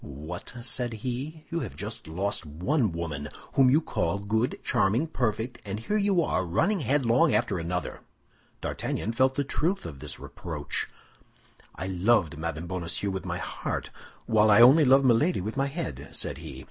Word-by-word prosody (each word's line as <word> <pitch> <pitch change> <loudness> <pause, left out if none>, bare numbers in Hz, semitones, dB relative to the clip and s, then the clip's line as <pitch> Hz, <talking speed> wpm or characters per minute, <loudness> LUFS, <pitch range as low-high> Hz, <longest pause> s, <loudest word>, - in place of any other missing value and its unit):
"What!" 80 - -8
said 120 -1 -2
he, 140 +6 -4
"you 170 - 0
have 125 - -5
just - - -6
lost 95 +6 -2
one 90 - 0
woman, 75 -3 -4 0.2
whom 135 -2 +6
you 145 +4 +5
call 85 - -1
good, 110 +4 0
charming, 115 +4 +2
perfect; 120 -5 -2
and 100 +1 -4
here 205 - -2
you 200 -4 +3
are, 95 - 0
running 150 - +1
headlong 130 -3 +3
after - - +1
another." 90 +2 -3 0.6
D'Artagnan 110 - -2
felt 130 +3 +2
the 145 - +1
truth 170 +7 -1
of 70 -5 -7
this - - -7
reproach. - - -4 0.9
"I 95 - -4
loved 95 -3 +2
Madame 80 +1 -4
Bonacieux 90 +2 -2
with 95 0 -4
my - - -2
heart, - - -4 0.3
while 110 -1 +4
I 105 - +7
only 135 +6 +8
love 135 +1 +6
Milady 135 +9 +4
with 105 +6 -4
my 135 0 +1
head," 80 - -5
said - - -1
he. - - -8
110 Hz, 170 wpm, -27 LUFS, 90-135 Hz, 0.9 s, only